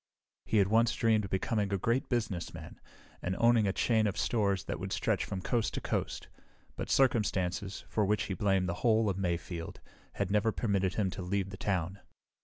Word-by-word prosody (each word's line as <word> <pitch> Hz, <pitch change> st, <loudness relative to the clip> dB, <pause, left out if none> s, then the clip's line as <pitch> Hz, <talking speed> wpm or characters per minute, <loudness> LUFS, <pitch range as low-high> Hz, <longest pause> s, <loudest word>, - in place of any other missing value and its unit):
He 110 Hz, -, +2 dB
had 100 Hz, -2 st, +5 dB
once 115 Hz, +1 st, +3 dB
dreamed 110 Hz, -2 st, +2 dB
of -, -, -7 dB
becoming 100 Hz, +1 st, 0 dB
a 100 Hz, -, +1 dB
great 115 Hz, +7 st, 0 dB
businessman 110 Hz, -9 st, -3 dB, 0.4 s
and 90 Hz, +1 st, -2 dB
owning 115 Hz, -3 st, +4 dB
a -, -, +2 dB
chain 110 Hz, +1 st, +2 dB
of 100 Hz, -, -3 dB
stores 100 Hz, -5 st, +1 dB
that -, -, -4 dB
would -, -, -5 dB
stretch -, -, 0 dB
from 95 Hz, -1 st, -5 dB
coast 115 Hz, -3 st, 0 dB
to -, -, -1 dB
coast, -, -, -3 dB, 0.5 s
but -, -, -5 dB
circumstances, 100 Hz, -7 st, +1 dB
for 110 Hz, -, 0 dB
which 105 Hz, +2 st, +1 dB
he 95 Hz, -, -3 dB
blamed 95 Hz, 0 st, +1 dB
the 85 Hz, -, -1 dB
whole 110 Hz, -3 st, +3 dB
of 95 Hz, -, -5 dB
Mayfield, 85 Hz, -2 st, -3 dB, 0.3 s
had 95 Hz, -, -2 dB
never 105 Hz, +2 st, +3 dB
permitted 100 Hz, -5 st, 0 dB
him 100 Hz, -4 st, 0 dB
to -, -, -6 dB
leave 95 Hz, +1 st, -2 dB
the -, -, -6 dB
town. 95 Hz, -1 st, -2 dB
100 Hz, 195 wpm, -31 LUFS, 95-110 Hz, 0.5 s, had